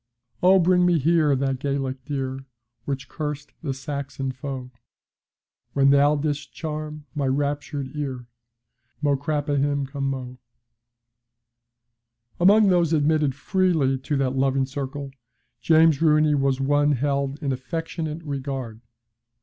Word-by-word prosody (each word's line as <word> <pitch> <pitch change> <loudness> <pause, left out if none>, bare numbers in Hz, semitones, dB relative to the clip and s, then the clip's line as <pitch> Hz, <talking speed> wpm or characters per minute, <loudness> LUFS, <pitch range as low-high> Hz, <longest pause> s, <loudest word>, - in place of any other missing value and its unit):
Oh, 185 +2 +6
bring 180 0 +4
me 175 -1 +4
here 155 -1 +3
that 135 -1 -1
Gaelic 135 -1 -2
dear 135 -2 -3 0.5
Which 135 -1 -4
cursed 150 -2 -5
the 150 -5 -2
Saxon 135 0 -4
foe. 130 -1 -6 1.0
When 140 0 +4
thou 145 +1 +5
didst 145 0 -3
charm 150 -1 -5
my 145 -3 -1
raptured 145 0 -2
ear 135 -4 -4 0.8
Mo 145 -1 +3
craoibhin 145 -1 -1
cno! 135 -2 -4 2.0
Among 200 +3 +6
those 170 -3 +3
admitted 150 -2 +2
freely 145 -4 +1
to 145 +2 -2
that 135 -1 0
loving 135 0 +2
circle, 140 +1 -5 0.5
James 160 -2 +4
Rooney 155 -1 +4
was 135 -2 +1
one 145 +2 +2
held 140 +1 -1
in 140 - 0
affectionate 160 +4 -4
regard. 135 -6 -5
145 Hz, 115 wpm, -24 LUFS, 135-155 Hz, 2.0 s, Oh